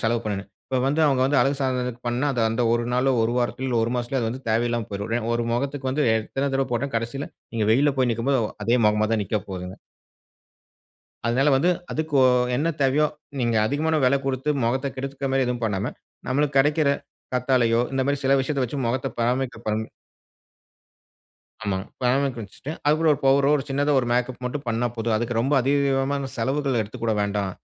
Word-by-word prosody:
செலவு 115 +1 +1
பண்ணுனேன். 100 -1 -3 0.2
இப்ப 130 - -1
வந்து 145 +4 +1
அவுங்க 135 -3 +2
வந்து 140 +1 +3
அழகு 140 +1 +2
சாதனதுக்குப் 125 -2 -2
பண்னா, 120 +4 0
அது 125 - -1
அந்த 115 +2 0
ஒரு 120 0 +1
நாளோ, 125 +2 +2
ஒரு 115 +1 +1
வாரத்திலோ, 120 +1 -1
ஒரு 115 - -2
மாசத்திலோ 125 +2 -1
அது 115 - 0
வந்து 130 +2 -8
தேவையில்லாம 120 0 0
போயிரும். 100 +3 -4
ஏ - - -3
ஒரு 120 - 0
முகத்துக்கு 135 +2 -2
வந்து 145 +3 +1
எத்தன 135 +5 -2
தடவை 135 0 +1
போட்டா, 125 +4 0
கடசில 120 +5 -3 0.3
நீங்க 110 -2 0
வெயில்ல 140 +5 +3
போய் 130 -2 +3
நிக்கும்போது 125 +3 +1
ஒ - - -7 0.2
அதே 115 +4 +3
முகமா 105 0 +2
தான் 110 - +1
நிக்க 110 - -1
போதுங்க. 90 0 -6 1.5
அதனால 130 +5 +2
வந்து 150 +7 +3 0.2
அதுக்கு 155 -1 -3
ஒ - - +7 0.3
என்ன 150 +6 0
தேவையோ, 140 +3 +3 0.3
நீங்க 120 -3 +1
அதிகமான 155 +5 0
விலை 135 +2 +4
கொடுத்து 135 +2 -1
முகத்த 130 +4 0
கெடுத்துக்க 135 +1 -4
மாரி 135 0 +2
எதுவும் 120 -1 -2
பண்ணாம, 100 -2 -1 0.4
நம்மளுக்கு 140 +2 0
கிடைக்கிற 145 +1 +3 0.4
கத்தாழையோ, 125 -2 +2
இந்தமாரி 135 +1 0
சில 135 +1 +4
விஷயத்த 135 0 -1
வச்சி 135 +4 -4
முகத்த 120 +2 -1
பராமரிக்க 125 0 0
பண் 110 +1 0 1.8
ஆமாங்க, 95 -2 -1 0.2
பராமரிக்க 130 +1 +1
வச்சிட்டு, 110 +8 -8
அது 150 - +5
கூட 165 0 +2
ஒரு 140 - -2
பவுடரோ 135 +1 +4
ஒரு 135 - -2
சின்னதா 145 +2 +1
ஒரு 120 - -3
மேக்கப் 125 +1 -1
மட்டும் 135 +3 -3
பண்னா 115 +1 0
போதும். 115 0 0
அதுக்கு 120 +2 -2
ரொம்ப 135 +5 0
அதிகமான 140 0 +1
செலவுகள் 135 +2 0
எடுத்துக்கொள்ள 110 +2 -3
வேண்டாம். 100 -1 -1
130 Hz, 180 wpm, -24 LUFS, 115-140 Hz, 1.8 s, ஒ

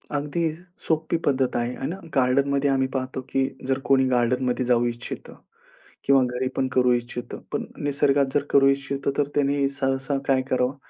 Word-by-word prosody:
अगदी 155 +3 -1 0.4
सोपी 160 +1 +1
पद्धत 130 -2 +1
आहे, 120 +1 -1
आहे 135 - -4
ना. 175 - -3 0.2
गार्डनमध्ये 140 +2 +2
आम्ही 130 -1 +2
पाहतो 130 0 -3
की 135 0 +1 0.2
जर 135 0 +1
कोणी 135 -1 +4
गार्डनमध्ये 125 +1 +1
जाऊ 120 -1 +3
इच्छितं 120 0 -5 0.7
किंवा 135 -1 +5
घरी 125 +1 -1
पण 130 -1 +1
करू 125 -1 +4
इच्छितं. 120 0 -4
पण - - -2 0.2
निसर्गात 140 -1 +2
जर 145 - +2
करू 135 -1 +6
इच्छितं, 140 0 -1
तर 145 -1 +2
त्यांनी 140 -1 +2
सहसा 135 0 -1
काय 135 -1 +3
करावं? 130 +1 +1
135 Hz, 165 wpm, -24 LUFS, 125-140 Hz, 0.7 s, करू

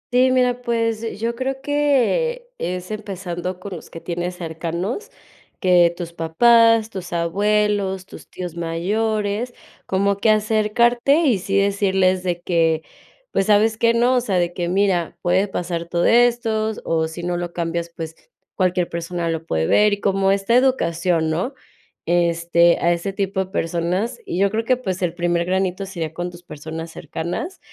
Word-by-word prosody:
Sí, 255 +1 +5
mira, 250 -1 +2
pues, 230 -2 -1
eh 230 - -4
yo 230 +3 -2
creo 265 +2 -3
que, 295 - +1
es 180 +2 -4
empezando 185 -4 -5
con 190 0 -7
los 165 - -11
que 165 - -9
tienes 175 +1 -4
cercanos, 170 - -4 0.5
que 180 -2 +5
tus 170 -2 -6
papás, 230 +7 +4
tus 180 -2 -7
abuelos, 195 +2 0
tus - - -13
tíos 180 -2 -6
mayores, 205 +7 -1 0.3
como 200 +1 +1
que 220 - +2
acercarte 220 +5 +3
y 255 - +2
sí 195 +2 -1
decirles 195 -2 +2
de 175 -1 -2
que, 165 -2 +1 0.5
pues, 195 - 0
¿sabes 215 +1 +4
qué, 230 0 +3
no? 240 +2 +3
O - - +2
sea, 200 -6 -1
de 175 0 0
que: 175 -1 -2
"Mira, 185 -3 +1
puede 190 +3 +2
pasar 170 -3 -3
todo 170 0 +1
esto 230 -2 +3
o 160 -1 +1
si 160 +2 -8
no 175 0 -1
lo 175 0 -3
cambias, 170 0 -3
pues, 165 -1 -7 0.4
cualquier 180 -2 0
persona 170 0 -3
lo 165 0 -3
puede 80 0 0
ver". 210 - +4
Y 205 - -2
como 195 -1 +2
esta 195 +3 +1
educación, 170 -10 +2
¿no? 185 - -2 0.5
Este, 170 0 +3
a 170 0 +3
ese 170 +3 -3
tipo 190 -1 -1
de 185 - -20
personas, 180 - -1
y - - -3
yo 200 +1 +2
creo 220 +2 -1
que, 255 +2 +2
pues, 190 -7 -4
el 175 -2 -1
primer 175 -1 0
granito 190 +1 -1
sería 165 -5 -5
con 175 +2 -4
tus 175 0 -13
personas 160 +1 -7
cercanas, 170 - -5
190 Hz, 170 wpm, -21 LUFS, 170-220 Hz, 0.5 s, Sí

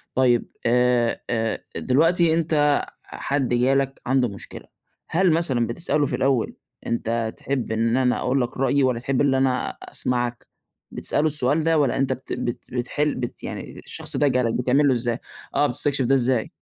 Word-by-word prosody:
طيب 125 -2 +3 0.2
آآ، 125 0 +2
آآ، 115 -2 -1 0.2
دلوقتي 165 +5 +3
أنت 150 -3 +2 0.2
حد 135 -2 -2
جالك 135 +2 +1
عنده 130 -1 +3
مشكلة، 100 - -9 0.4
هل 180 +1 +3
مثلًا 135 -8 +1
بتسأله 150 +2 0
في - - -2
الأول 130 -4 +1 0.3
"أنت 115 -1 -1
تحب 130 -4 -3
إن 115 +2 +1
أنا 125 -1 +2
أقول 130 +2 +1
لك 125 +1 -3
رأيي 135 +1 +2
ولا 125 -2 +1
تحب 130 +2 0
إن 140 -2 +3
أنا 130 -1 +1
أسمعك؟"، 120 -1 -3 0.4
بتسأله 150 - 0
السؤال 150 +1 +1
ده 165 0 +3
ولا 140 -4 +1
أنت 135 -1 +1
بت 130 - -7
بت 120 - -3
بتحل 145 +4 -1
بت 120 -2 -5
يعني - - -7
الشخص - - -6
ده 145 - +3
جالك 125 -3 +1
بتعمل 130 +4 +3
له 130 - +4
إزاي؟ 120 0 -1 0.4
آه 145 - +4
بتستكشف 135 +1 0
ده 135 +3 +4
إزاي؟ 125 -2 +1
130 Hz, 165 wpm, -23 LUFS, 120-145 Hz, 0.4 s, له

